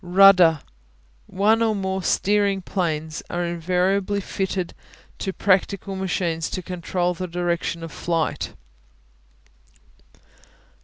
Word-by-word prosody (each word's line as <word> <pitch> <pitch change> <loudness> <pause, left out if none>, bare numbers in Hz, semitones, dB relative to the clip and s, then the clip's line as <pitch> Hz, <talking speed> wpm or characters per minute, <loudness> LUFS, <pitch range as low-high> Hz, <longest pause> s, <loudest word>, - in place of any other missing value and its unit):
Rudder 180 -4 +6 0.7
One 215 +4 +2
or 220 -2 +2
more 190 -1 -2
steering 200 0 +1
planes 160 -5 -2
are 175 0 -2
invariably 185 +4 0
fitted 190 -2 -3 0.5
to 190 - -2
practical 195 0 +1
machines 175 -4 -1
to 185 - -4
control 180 0 -2
the 185 +1 -5
direction 170 -1 -2
of 165 - -7
flight. 165 0 -2
185 Hz, 100 wpm, -23 LUFS, 170-195 Hz, 0.7 s, Rudder